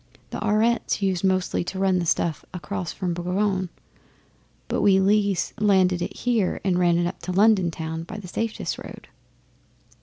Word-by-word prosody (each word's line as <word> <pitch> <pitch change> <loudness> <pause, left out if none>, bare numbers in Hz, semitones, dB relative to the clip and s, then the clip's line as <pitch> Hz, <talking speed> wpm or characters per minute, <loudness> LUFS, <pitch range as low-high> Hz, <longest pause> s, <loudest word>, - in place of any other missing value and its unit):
The - - -4
Aurettes 220 0 +1
used 190 -2 0
mostly 185 -2 +1
to 190 - -6
run 190 -1 +2
the 170 - -2
stuff 160 -1 0
across 180 +1 -4
from 180 -3 -3
Boulogne, 185 +2 -1 1.0
and - - -1
we 195 -2 +5
Lees 200 -2 +2
landed 190 -4 +3
it - - -4
here 230 -6 0
and 180 -2 +1
ran 175 -1 +3
it 175 - +1
up 175 - -4
to 185 - -5
London 195 -2 +4
Town, 160 0 -5
by 175 +6 -8
the 205 -3 -8
safest 225 +4 -3
road. - - -11
185 Hz, 170 wpm, -24 LUFS, 175-205 Hz, 1.0 s, we